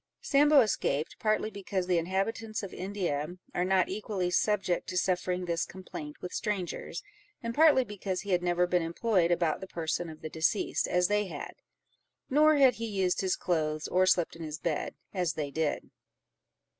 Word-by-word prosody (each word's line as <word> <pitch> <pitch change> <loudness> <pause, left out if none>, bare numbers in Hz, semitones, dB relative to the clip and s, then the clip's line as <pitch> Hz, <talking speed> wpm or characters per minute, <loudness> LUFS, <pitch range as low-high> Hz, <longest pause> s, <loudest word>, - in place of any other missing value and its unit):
Sambo 290 0 +6
escaped, 160 - 0
partly 215 0 +1
because 195 -2 -3
the 180 -2 +2
inhabitants 205 +5 -2
of 195 - -6
India 180 -4 -3 0.2
are 175 - 0
not 185 0 +3
equally 195 -2 -2
subject 195 -2 +1
to 180 - -3
suffering 180 0 0
this 170 -1 0
complaint 155 -5 -8
with 180 - -5
strangers, 205 -5 -3 0.4
and 230 0 -2
partly 295 -2 +6
because 200 -4 -4
he 200 - -5
had 180 -1 +3
never 175 0 +2
been 180 0 +1
employed 170 +2 +1
about 170 -3 +1
the 190 - -6
person 165 0 -2
of 155 -1 -11
the - - -3
deceased 160 +7 0
as 180 0 +2
they 210 0 +1
had, 150 -5 -7 0.8
nor 305 +2 +6
had 270 -3 +6
he 230 0 -4
used 190 -4 0
his 190 -1 +1
clothes, 155 -3 -1
nor 185 +1 +4
slept 175 -3 +2
in 165 - -10
his 155 -1 -5
bed, 160 -1 -2 0.2
as 180 -4 0
they 150 -3 -4
did. 155 +1 -2
180 Hz, 175 wpm, -30 LUFS, 170-210 Hz, 0.8 s, Sambo